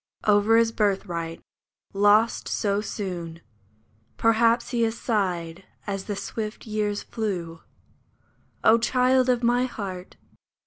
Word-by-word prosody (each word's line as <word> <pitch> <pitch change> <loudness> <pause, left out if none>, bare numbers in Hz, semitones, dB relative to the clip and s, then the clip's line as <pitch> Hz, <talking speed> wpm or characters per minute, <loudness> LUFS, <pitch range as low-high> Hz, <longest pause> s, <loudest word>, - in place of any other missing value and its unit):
Over 210 +2 +4
his 230 -1 +3
birthright, 185 -6 -2 0.5
lost 205 +3 +3
so 205 -1 0
soon, 175 -6 -5 0.8
Perhaps 230 +1 +3
he 240 -2 0
has 225 0 0
sighed 185 -5 -2 0.2
as 195 -2 -4
the 205 - -3
swift 215 +2 -5
years 210 -2 -2
flew; 175 -7 -4 1.0
O 225 +1 +6
child 255 +2 +2
of 245 -1 +1
my 245 +1 +3
heart 190 -7 -7
210 Hz, 115 wpm, -25 LUFS, 190-230 Hz, 1.0 s, O